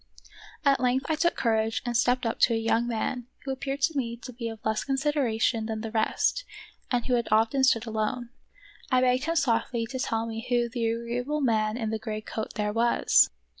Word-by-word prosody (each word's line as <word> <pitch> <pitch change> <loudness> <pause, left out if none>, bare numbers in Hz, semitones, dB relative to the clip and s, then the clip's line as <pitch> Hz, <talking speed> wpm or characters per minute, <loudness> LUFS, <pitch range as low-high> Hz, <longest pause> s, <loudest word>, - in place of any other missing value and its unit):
At 275 -1 +4
length 255 +1 +1
I - - +3
took 340 +3 +1
courage 225 -1 0
and 240 -1 -2
stepped 245 +1 +2
up 230 - -1
to 235 - +4
a - - +1
young 225 +1 +1
man 240 +1 -2 0.2
who 270 - -3
appeared 270 +1 -4
to 325 0 +2
me 235 -4 -2
to 255 - -7
be 230 -1 -4
of 225 - -7
less 220 0 0
consideration 265 -5 0
than 220 -1 -3
the 225 -1 -5
rest 230 - +1 0.5
and 245 -2 0
who 255 - 0
had 235 -1 +1
often 225 +5 +3
stood 230 -3 +3
alone. 225 +2 -2 0.6
I 255 -1 +3
begged 255 +2 +2
him 330 +1 0
softly 235 -4 +1
to 260 +3 -6
tell 225 -3 -1
me 225 0 -5
who 240 -1 +2
the 235 -1 -1
agreeable 240 +6 -2
man 220 -3 +1
in 220 -3 -2
the 220 - -2
gray 215 -2 -4
coat 220 0 -5
there 210 -1 -1
was. 230 - +4
235 Hz, 205 wpm, -27 LUFS, 225-255 Hz, 0.6 s, At